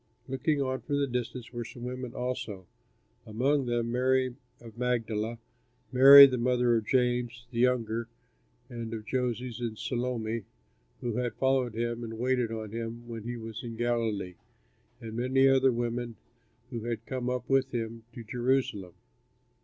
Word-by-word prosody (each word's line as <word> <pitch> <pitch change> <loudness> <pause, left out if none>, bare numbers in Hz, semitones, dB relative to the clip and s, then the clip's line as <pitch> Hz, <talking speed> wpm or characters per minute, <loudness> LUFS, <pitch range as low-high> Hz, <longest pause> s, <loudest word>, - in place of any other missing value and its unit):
Looking 135 +3 0
on 130 0 -2
from 145 - -2
a 140 - +2
distance 125 -1 -4
were 120 0 -3
some 120 +1 -10
women 125 0 -5
also, 125 -7 -4 0.6
among 130 +5 +1
them 120 -1 0
Mary 130 0 +1 0.2
of 115 -2 -12
Magdala, 115 -2 -1 0.5
Mary 135 +2 +11
the 130 -2 0
mother 125 -1 +2
of 110 -1 -1
James, 125 -1 0
the 115 - -3
younger, 115 -2 +1 0.6
and 115 -3 -6
of 110 -1 -7
Joses, 125 -1 -2
and 115 -2 -4
Salome, 115 -3 -2 0.6
who 120 -2 -2
had 125 -1 -2
followed 130 -4 +1
him 120 +1 -2
and 115 -1 -6
waited 125 -1 0
on 110 -2 -5
him 115 +1 -5
when 115 -2 -7
he 120 0 -4
was 115 -1 -7
in 115 -1 -6
Galilee, 115 -6 -1 0.7
and 110 -1 -8
many 130 +3 +3
other 135 0 +5
women 120 0 -2 0.6
who 115 -2 -5
had 115 -1 -3
come 125 -2 -3
up 125 -1 -3
with 135 0 +2
him 115 -1 -4
to 120 - -8
Jerusalem. 120 -6 -1
120 Hz, 155 wpm, -29 LUFS, 115-125 Hz, 0.7 s, Mary